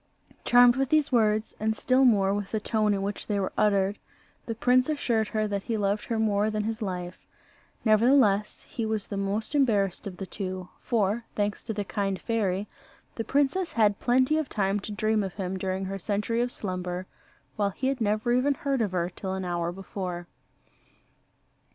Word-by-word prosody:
Charmed 245 0 +6
with 270 -1 0
these 305 -2 +2
words, 215 -2 +2
and 220 0 0
still 260 +1 +3
more 200 -5 +4
with 205 -1 -3
the 220 - -1
tone 215 0 +1
in 195 - -2
which 200 +1 -4
they 205 -2 0
were 190 - -2
uttered, 200 -1 +2 0.5
the 230 - -3
prince 255 +4 +3
assured 235 -7 0
her 215 0 -1
that 200 -1 -2
he 225 +2 -2
loved 205 0 0
her 230 - -2
more 210 -1 +2
than 215 -1 -1
his 225 +1 -3
life. 180 -3 -4 0.7
Nevertheless, 215 -2 +3
he 230 - -4
was 220 -2 -1
the 205 - -6
most 200 +4 -2
embarrassed 210 -9 +1
of 185 -2 -7
the 195 - -5
two; 185 -1 -5
for, 225 -1 0
thanks 205 0 -1
to 230 - -3
the 205 -1 -2
kind 195 -1 -2
fairy, 205 -2 -1 0.5
the 225 - -3
princess 290 +8 +1
had 210 -3 +3
plenty 260 +5 +3
of 310 - -3
time 200 -1 0
to 210 - -7
dream 215 +1 +1
of 190 -3 -4
him 190 -2 -3
during 190 0 -2
her 195 +1 -4
century 210 +5 -1
of 245 0 0
slumber, 180 -3 -4 0.5
while 205 -1 +1
he 230 +7 -5
had 265 -2 0
never 215 +2 +1
even 270 +3 +2
heard 275 -3 -1
of 205 -4 -1
her 175 0 -1
till 190 -1 -4
an 190 -1 -4
hour 175 -1 -1
before. 180 -1 -5
210 Hz, 190 wpm, -27 LUFS, 195-230 Hz, 0.7 s, Charmed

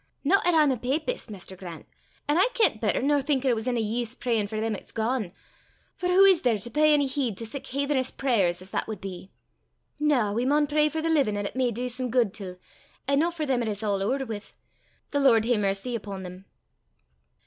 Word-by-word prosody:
no 370 +8 +4
'at 350 -1 +3
I'm 305 -3 +5
a 255 - -1
papist, 285 - -2
Maister 190 -2 -9
Grant, 175 -3 -9 0.4
an' 295 - +2
aye 380 - +5
kent 380 - +2
better 220 +2 +1
nor 290 0 +3
think 275 -1 0
it 255 - +4
was 225 +1 -3
ony 240 -3 0
eese 230 +2 -3
prayin' 225 -4 0
for 215 +1 -4
them 220 0 -1
'at's - - -11
gane; 225 -3 -1 0.6
for 360 - -2
wha 370 +2 +6
is 380 -4 +6
there 240 -4 +2
to 220 +4 -8
pey 305 +2 +4
ony 285 -1 +2
heed 260 -6 -2
to 230 - -5
sic 265 +5 -6
haithenish 280 -1 -1
prayers 195 -10 +1
as 185 - -15
that - - -2
wad 220 -1 -5
be? 190 0 -8 0.7
Na! 265 -9 +2
we 235 +3 0
maun 295 +3 +3
pray 300 +1 +2
for 315 0 -3
the 330 - 0
livin' 275 -10 +2
'at 205 - -2
it - - -5
may 255 -1 +1
dee 240 +2 -3
some 250 +1 -3
guid 235 -4 +2
till, 190 -4 -7 0.5
an' 280 0 +3
no 330 +3 +2
for 330 -3 -4
them 260 -3 +1
'at 230 - -2
it's 210 0 -3
a' - - -2
ower 210 +7 0
wi' 220 -4 -5 0.7
the 285 - +1
Lord 235 -6 +4
hae 240 +1 +3
mercy 200 +4 -1
upo' 200 -3 -6
them!" 185 +1 -9
245 Hz, 230 wpm, -26 LUFS, 210-285 Hz, 0.7 s, wha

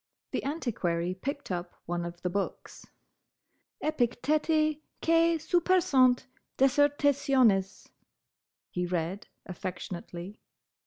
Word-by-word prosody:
The - - -2
Antiquary 185 - -1
picked 275 +6 -5
up 175 0 -4
one 175 0 -2
of 175 0 -8
the 180 - 0
books. 200 +1 -4 1.0
"'Epicteti 305 +3 +1 0.2
quæ 330 0 +4
supersunt 315 -6 +3 0.3
Dissertationes,'" 270 -7 +3 0.9
he 180 0 -2
read, 175 +3 -2 0.2
affectionately. 180 +1 -6
245 Hz, 85 wpm, -29 LUFS, 180-295 Hz, 1.0 s, quæ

